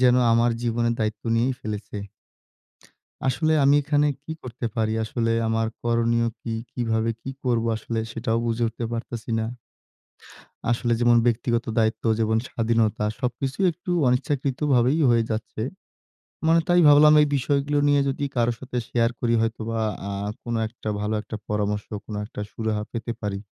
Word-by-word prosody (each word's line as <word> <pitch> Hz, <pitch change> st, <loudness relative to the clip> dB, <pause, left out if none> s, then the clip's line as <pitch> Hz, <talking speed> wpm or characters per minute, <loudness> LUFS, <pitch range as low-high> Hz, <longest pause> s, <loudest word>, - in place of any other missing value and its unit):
যেন 125 Hz, -1 st, +5 dB, 0.2 s
আমার 115 Hz, +1 st, +4 dB
জীবনের 115 Hz, 0 st, +1 dB
দায়িত্ব 110 Hz, -1 st, -2 dB
নিয়েই 125 Hz, +3 st, +2 dB
ফেলেছে। 105 Hz, -1 st, -5 dB, 1.3 s
আসলে 155 Hz, +4 st, +2 dB
আমি 140 Hz, +1 st, +6 dB
এখানে 145 Hz, +1 st, +2 dB, 0.2 s
কি -, -, -6 dB
করতে 120 Hz, -1 st, -6 dB
পারি? 110 Hz, -1 st, +1 dB
আসলে 115 Hz, +1 st, -1 dB, 0.2 s
আমার 115 Hz, 0 st, +1 dB, 0.2 s
করনীয় 115 Hz, 0 st, +2 dB
কি? 115 Hz, -, -4 dB, 0.2 s
কিভাবে 115 Hz, -2 st, 0 dB
কি 135 Hz, -, -6 dB
করব? 120 Hz, -2 st, +1 dB
আসলে 115 Hz, +1 st, -3 dB
সেটাও 115 Hz, 0 st, -1 dB
বুঝে 115 Hz, 0 st, 0 dB
উঠতে 115 Hz, +1 st, -4 dB
পারতেছি 115 Hz, 0 st, -5 dB
না। 110 Hz, -, -1 dB, 1.3 s
আসলে 120 Hz, 0 st, +1 dB
যেমন 120 Hz, 0 st, +5 dB
ব্যক্তিগত 120 Hz, 0 st, +1 dB
দায়িত্ব 110 Hz, 0 st, +1 dB
যেমন 110 Hz, 0 st, +2 dB
স্বাধীনতা 115 Hz, -2 st, +1 dB, 0.2 s
সবকিছু 130 Hz, +1 st, -2 dB
একটু 175 Hz, +2 st, -8 dB, 0.2 s
অনিচ্ছাকৃত 130 Hz, +1 st, 0 dB, 0.2 s
ভাবেই 125 Hz, +6 st, +3 dB
হয়ে 115 Hz, -1 st, +3 dB
যাচ্ছে। 110 Hz, 0 st, -3 dB, 0.9 s
মানে 165 Hz, +1 st, +5 dB
তাই 175 Hz, 0 st, +5 dB
ভাবলাম 150 Hz, +1 st, +8 dB
এই 150 Hz, -, +4 dB
বিষয়গুলো 140 Hz, +2 st, +1 dB
নিয়ে 145 Hz, -1 st, +4 dB
যদি 140 Hz, +1 st, -3 dB
কারো 120 Hz, -1 st, +2 dB
সাথে 125 Hz, -1 st, -5 dB
শেয়ার 115 Hz, -1 st, +2 dB
করি 115 Hz, -1 st, +1 dB
হয়তো 115 Hz, 0 st, -1 dB
বা 115 Hz, 0 st, -1 dB, 0.3 s
আ -, -, -3 dB, 0.3 s
কোনো 120 Hz, -1 st, -2 dB
একটা 110 Hz, -1 st, -7 dB
ভালো 105 Hz, +1 st, -1 dB
একটা 110 Hz, -, -7 dB
পরামর্শ, 105 Hz, 0 st, -1 dB, 0.2 s
কোন 105 Hz, -, -6 dB
একটা 105 Hz, -1 st, -7 dB
সুরাহা 110 Hz, -2 st, -2 dB
পেতে 115 Hz, 0 st, -4 dB
পারি। 100 Hz, -2 st, -2 dB
115 Hz, 155 wpm, -24 LUFS, 110-125 Hz, 1.3 s, ভাবলাম